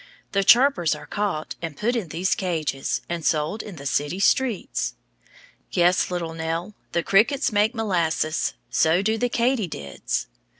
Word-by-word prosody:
The 195 -1 +2
chirpers 240 - +5
are - - -10
caught 200 -7 -2
and 165 -4 -5
put 240 +4 0
in 220 -7 -2
these 180 +5 0
cages, 160 -7 -2
and 170 -1 -4
sold 155 +8 0
in 205 - -9
the 140 - -10
city 145 +6 -1
streets. 235 +1 +1 0.8
Yes, 175 +1 +3
little 170 -2 -3
Nell, 165 +4 -3 0.2
the 170 - 0
crickets 235 - +3
make 215 +3 +2
molasses. 170 -7 0 0.2
So 165 +4 +3
do 220 +2 +1
the 245 - +1
katydids. 220 - -1
180 Hz, 145 wpm, -24 LUFS, 160-215 Hz, 0.8 s, chirpers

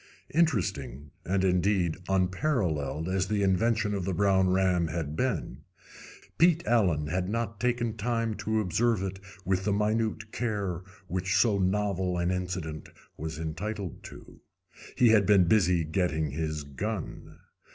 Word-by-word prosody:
Interesting 85 - 0
and, 95 +1 0
indeed, 90 -2 +2
unparalleled 90 - 0
as 95 0 0
the 105 -1 0
intervention 105 +3 +2
of 100 -2 -2
the 95 0 -2
brown 95 0 +3
ram 90 -2 +2
had 80 -2 -3
been, 125 -2 -2 0.8
Pete 170 0 +4
Allen 90 -11 +2
had 90 +4 -2
not 115 -1 -3
taken 120 -2 0
time 115 +1 -1
to 110 0 0
observe 110 +2 +1
it 95 0 -4 0.3
with 95 0 0
the 105 - 0
minute 110 +1 0
care 100 -7 -2 0.2
which 95 +1 -1
so 100 0 +3
novel 95 -1 0
an 85 +1 0
incident 90 -4 -4 0.3
was 80 +1 -5
entitled 95 +4 -5
to. - - -13 0.6
He 120 - +6
had 105 -4 +4
been 100 -3 +6
busy 90 -3 +3
getting 80 -2 -1
his 75 0 -3
gun. 95 +7 -5
95 Hz, 140 wpm, -28 LUFS, 85-110 Hz, 0.8 s, He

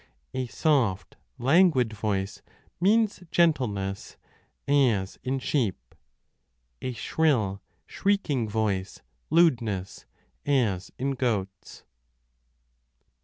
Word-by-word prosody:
A 130 -1 -2
soft, 120 - 0 0.2
languid 135 -3 +3
voice 100 -2 -2 0.4
means 210 +3 +2
gentleness, 110 - 0 0.5
as 120 -9 +2
in 130 +1 -1
s 135 - -5
sheep: 100 - -1 0.9
a 130 - -3
shrill, 115 -9 0 0.2
shrieking 150 - 0
voice, 105 -3 -2 0.3
lewdness, 115 - +1 0.4
as 115 -10 0
in 135 +2 -1
goats. 105 -8 -3
120 Hz, 80 wpm, -27 LUFS, 100-145 Hz, 0.9 s, languid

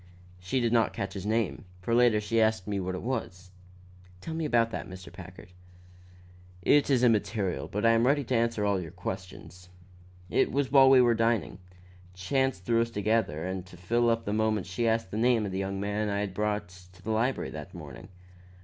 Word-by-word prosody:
"She 95 +9 -1
did 120 -1 0
not 115 -3 +2
catch 100 - -4
his 100 0 -6
name, 110 +1 -1 0.2
for 105 +6 -2
later 120 -2 +4
she 110 +2 0
asked 110 -4 +1
me 100 -1 -1
what 95 0 -3
it 90 - -6
was." 95 -7 -4 0.7
"Tell 160 - -6
me 160 0 -2
about 115 -5 +2
that, - - -5
Mr. 90 -2 -10
Packard." 90 -1 -12 1.1
"It 145 +7 +4
is 130 -3 +3
immaterial; 100 - +1
but 105 +5 -2
I 115 - +6
am 115 +2 +3
ready 145 +1 +2
to 125 0 -1
answer 115 -2 +1
all 100 -2 +1
your 85 - -7
questions. 90 +1 -8 0.6
It - - +1
was 135 0 -1
while 135 -1 +7
we 130 -1 +7
were 120 -1 +4
out 115 - 0
dining. 115 -3 0 0.6
Chance 130 +5 0
threw 115 +4 +1
us 115 - -1
together, 105 -7 0
and 95 0 -4
to - - -14
fill 120 +7 +1
up 115 0 0
the 105 - -2
moment 110 -2 0
she 105 +6 -2
asked 110 -4 0
the 105 - -3
name 115 -1 +2
of 100 - -4
the 95 - -3
young 95 0 -3
man 105 +1 -1
I 100 0 -1
had 100 -2 -3
brought 105 -2 -2 0.2
into 95 0 -20
the 110 - -3
library 115 +4 0
that - - -9
morning. - - -10
110 Hz, 210 wpm, -28 LUFS, 95-115 Hz, 1.1 s, while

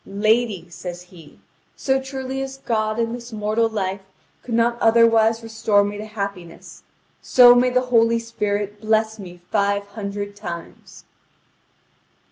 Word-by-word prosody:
"Lady," 210 -2 0
says 175 +1 -8
he, 175 -4 -16 0.4
"so 265 0 0
truly 265 0 -5
as 270 0 -6
God 215 -4 -1
in 230 0 -1
this 240 0 -8
mortal 215 +1 0
life 195 -3 -3 0.4
could 235 - -4
not 235 +1 +1
otherwise 225 0 +4
restore 220 -2 +1
me 205 0 -3
to 215 - -6
happiness, 200 -5 -7 0.4
so 245 -1 +7
may 245 +1 +3
the 250 0 +2
Holy 230 0 +4
Spirit 210 -3 -3
bless 220 0 0
me 175 -3 -11
five 200 -1 +1
hundred 205 -1 -6
times!" 175 -5 -9
220 Hz, 135 wpm, -21 LUFS, 200-230 Hz, 0.4 s, so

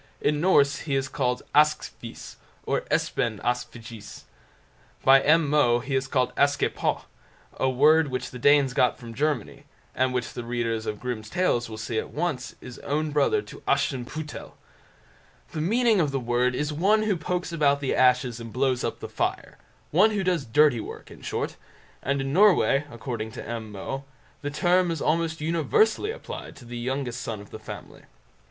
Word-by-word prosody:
In 150 0 +1
Norse 145 -6 +4
he 145 -3 -2
is 135 0 0
called 125 -2 -1
"Askefis", 150 +1 0 0.3
or - - 0
"Espen 110 -3 0
Askefjis". 115 -3 -5 0.8
By 135 0 +7
M. 160 +1 +4
Moe 140 -5 +4
he 135 +3 -5
is 130 0 0
called 130 -2 0
"Askepot", 140 0 +1 0.5
a 130 - +2
word 150 +5 +5
which 130 -2 -4
the 125 - -8
Danes 145 0 +4
got 125 -1 +2
from 115 -2 -10
Germany, 145 -3 -2 0.3
and 130 0 +1
which 125 -1 -3
the 120 - -5
readers 115 -2 -2
of 105 -1 -3
Grimm's 120 -4 -5
Tales 120 -10 +1
will 110 - -7
see 110 +1 -2
at - - -5
once 150 -6 -3
is 125 -1 -10
own 150 +2 -1
brother 410 - +2
to - - -12
Aschenpüttel. 145 +4 -2 1.0
The 155 - -3
meaning 220 +3 +3
of 150 - +1
the 135 -1 -1
word 125 +1 +1
is 150 +2 -1
"one 205 +8 +3
who 215 -2 +1
pokes 180 +2 -3
about 145 -4 +2
the 140 -2 -1
ashes 125 -2 +3
and 115 -1 -8
blows 130 0 0
up - - -3
the - - -5
fire"; - - -3 0.3
one 185 +8 +5
who 205 -3 -1
does 180 -6 0
dirty 140 +1 +4
work - - -8
in - - -13
short; - - -3 0.4
and 140 +1 0
in 135 +1 -3
Norway, 180 -7 +4
according 115 -2 -5
to - - -8
M. 115 -2 -5
Moe, 135 +7 -5 0.4
the 145 - -3
term 180 +4 +2
is 165 -2 -2
almost 160 +1 0
universally 170 - +2
applied 470 +3 -7
to 125 - -14
the 120 0 -6
youngest 125 -1 -3
son 115 -2 -4
of 100 - -13
the 110 - -8
family. 110 - -10
135 Hz, 175 wpm, -26 LUFS, 120-155 Hz, 1.0 s, By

